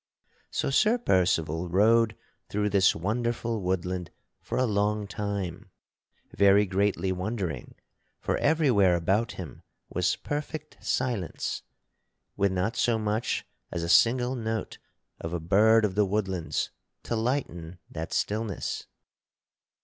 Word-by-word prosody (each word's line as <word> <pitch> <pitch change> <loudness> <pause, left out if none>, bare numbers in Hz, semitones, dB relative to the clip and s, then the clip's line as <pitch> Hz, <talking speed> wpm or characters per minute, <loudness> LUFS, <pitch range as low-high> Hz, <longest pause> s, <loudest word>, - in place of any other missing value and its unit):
So - - -1
Sir 215 - +4
Percival 85 - +1
rode 110 +4 +4 0.3
through 105 0 0
this 95 -1 +4
wonderful 115 +4 -1
woodland 90 -1 -2 0.3
for - - -4
a 130 - +3
long 105 -1 +1
time 100 -3 -4 0.7
very 100 +1 +5
greatly 95 0 0
wondering, 90 - -3 0.4
for - - -1
everywhere 130 - +4
about 100 +7 +1
him 90 -4 -8 0.3
was 90 +1 +1
perfect 150 +1 -5
silence, 120 -9 -1 0.7
with 100 -1 +2
not 95 +4 -1
so 115 -1 +2
much 110 +1 -1 0.3
as 85 - -3
a - - -2
single 120 +7 +4
note 110 -3 -3 0.4
of 80 +1 -5
a 85 - -1
bird 105 +7 +5
of 100 - -1
the 105 0 +2
woodlands 95 -4 -1 0.3
to 115 - -2
lighten 110 - -2
that 80 0 -5
stillness. 105 -2 -2
100 Hz, 120 wpm, -28 LUFS, 90-115 Hz, 0.7 s, very